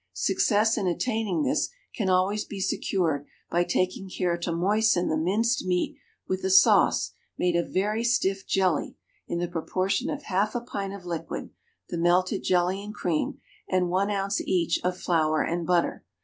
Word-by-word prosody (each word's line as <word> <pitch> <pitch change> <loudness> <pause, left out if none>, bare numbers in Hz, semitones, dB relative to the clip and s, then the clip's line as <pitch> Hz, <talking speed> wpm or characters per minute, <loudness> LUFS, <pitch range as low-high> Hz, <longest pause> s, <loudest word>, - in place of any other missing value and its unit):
Success 205 - +2
in 195 - -1
attaining 200 -3 0
this - - +1 0.2
can 205 -6 -1
always 185 +3 +2
be 200 - -8
secured 175 -6 0 0.3
by 175 +1 +3
taking 185 +2 -1
care 180 -2 0
to 170 0 -3
moisten 190 +2 +2
the 155 - +1
minced 205 +9 +1
meat 180 -1 0 0.3
with 185 0 -2
a 190 - 0
sauce 190 0 +5 0.3
made 180 -1 +1
of 170 - 0
very 210 +4 0
stiff 195 -5 +1
jelly 185 -5 +1 0.3
in 170 - -2
the 175 0 -1
proportion 185 - -1
of 290 0 -4
half 205 +4 0
a 240 - 0
pint 200 -4 -5
of 190 -3 -11
liquid 170 -2 -5 0.4
(the 170 - -3
melted 180 +3 +2
jelly 185 +2 +1
and 210 +1 -8
cream) 165 -6 -1 0.3
and 185 -1 +1
one 195 +3 +1
ounce 200 0 -1
each 175 -3 +1
of 180 0 0
flour 155 -4 +1
and 170 0 -2
butter. 175 -1 +1
185 Hz, 170 wpm, -26 LUFS, 175-200 Hz, 0.4 s, sauce